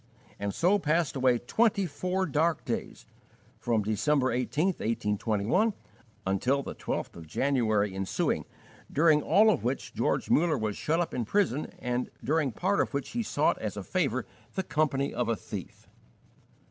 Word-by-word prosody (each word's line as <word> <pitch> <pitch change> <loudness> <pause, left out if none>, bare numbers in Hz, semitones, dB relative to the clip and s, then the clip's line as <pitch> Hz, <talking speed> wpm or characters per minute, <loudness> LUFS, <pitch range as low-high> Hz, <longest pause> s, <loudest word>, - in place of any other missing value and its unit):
And 100 0 -2
so 180 - +3
passed 165 -2 +1
away 130 -2 +3
twenty 205 - +2
four 185 +4 -1
dark 165 0 +1
days, - - -4 0.5
from 115 -3 +1
December 130 +6 +1
18, 145 +8 +1
1821, 115 - 0 0.5
until 125 +9 +1
the - - -6
12th - - -4
of 80 -2 -10
January 110 - +1
ensuing, 95 0 -1 0.5
during 155 0 +4
all 210 +9 +5
of 155 - -1
which 125 +3 -2
George - - 0
Muller 160 -2 +3
was 110 -3 -2
shut 160 +2 0
up 175 - -1
in 120 - -1
prison 155 - 0
and 125 0 -2
during 145 +2 +1
part 190 - +1
of - - -2
which 140 - -2
he 235 - -2
sought 225 - +1
as - - -4
a - - -4
favour - - 0 0.3
the 190 - 0
company 140 -4 0
of 125 - -1
a 115 - +2
thief. 100 -7 -8
140 Hz, 160 wpm, -29 LUFS, 115-170 Hz, 0.5 s, all